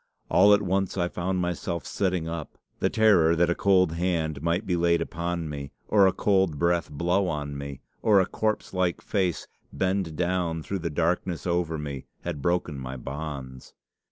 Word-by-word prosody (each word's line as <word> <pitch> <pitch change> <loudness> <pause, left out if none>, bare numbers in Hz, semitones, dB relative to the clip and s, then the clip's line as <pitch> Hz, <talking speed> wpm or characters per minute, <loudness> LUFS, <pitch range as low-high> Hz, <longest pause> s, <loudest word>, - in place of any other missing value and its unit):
All 100 +3 +6
at 100 - -1
once 95 0 0
I 90 -1 +1
found 90 +1 -2
myself 85 -2 -3
sitting 90 -4 -1
up. 80 -2 -6 0.2
The - - +2
terror 95 -7 +4
that 85 +1 +3
a - - +4
cold 95 -2 +3
hand 80 -4 -1
might 85 +6 0
be 90 - 0
laid 85 0 +3
upon 85 0 -3
me, 70 -2 -6
or 100 -2 +5
a - - +4
cold 95 -4 +1
breath 85 0 +1
blow 90 +6 +1
on 75 -3 -3
me, 70 -1 -7 0.2
or 105 -3 +5
a 95 - +3
corpse 110 +1 -2
like 90 -2 0
face 95 -5 -1 0.3
bend 95 -4 -1
down 85 -2 -1
through 100 +3 -3
the 85 - -2
darkness 85 +2 -1
over 85 -2 0
me, 70 -3 -6
had 70 - -4
broken 85 -2 0
my 65 0 -6
bonds! 70 -1 -7
85 Hz, 180 wpm, -26 LUFS, 80-95 Hz, 0.3 s, All